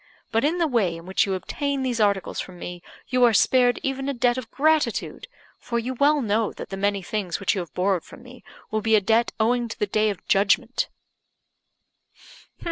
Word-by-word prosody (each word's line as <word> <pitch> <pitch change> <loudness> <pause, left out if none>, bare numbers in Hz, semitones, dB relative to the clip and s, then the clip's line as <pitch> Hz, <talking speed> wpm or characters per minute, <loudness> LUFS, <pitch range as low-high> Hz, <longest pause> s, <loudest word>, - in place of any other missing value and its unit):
But 225 - +1
in 315 +5 +1
the 340 - +2
way 215 - +1
in 165 - -12
which 190 +2 +1
you 190 - 0
obtain 280 +8 -3
these 245 -3 -1
articles 200 -3 +1
from 185 -1 -7
me, 175 0 -7 0.3
you 255 -1 +2
are 235 -3 +5
spared 245 +1 +4
even 270 0 -2
a 280 - -2
debt 240 0 +2
of 255 -3 -6
gratitude; 310 - 0 0.3
for 235 - -3
you 240 +3 -2
well 285 +2 +3
know 215 0 +1
that - - -8
the 195 - -4
many 200 0 -1
things 195 -2 -3
which 200 - +1
you 195 - -2
have 170 -4 -9
borrowed 185 -2 +1
from - - -14
me 250 0 -14 0.3
will 215 0 0
be 220 +1 +3
a - - +6
debt 225 +4 +2
owing 240 +2 +2
to 225 - -7
the - - 0
Day 215 +1 +1
of 200 -5 -6
Judgment." 210 +5 +2
225 Hz, 210 wpm, -24 LUFS, 200-255 Hz, 0.3 s, a